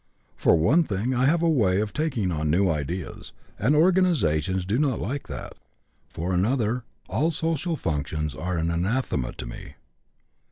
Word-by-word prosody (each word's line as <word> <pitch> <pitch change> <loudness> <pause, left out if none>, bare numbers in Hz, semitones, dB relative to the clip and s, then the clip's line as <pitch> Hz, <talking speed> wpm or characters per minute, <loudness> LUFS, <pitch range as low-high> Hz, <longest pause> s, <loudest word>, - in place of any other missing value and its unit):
For - - +4
one 140 - +4
thing 110 0 -2
I 125 +1 +2
have 165 +3 +2
a - - +4
way 105 - +3
of 105 0 -2
taking 135 - -1
on 75 -2 -1
new 90 +3 +3
ideas, 80 +4 -5 0.3
and 130 +9 +3
organizations 135 - +2
do 105 +7 0
not 140 -5 +1
like 135 +6 -4
that. - - -7 0.6
For 90 +3 -3
another, 115 +4 +1 0.2
all 160 +4 +1
social 165 +1 -1
functions 75 - -2
are 90 +7 -3
anathema 85 - -1
to - - -7
me. - - -9
105 Hz, 155 wpm, -25 LUFS, -, 0.6 s, For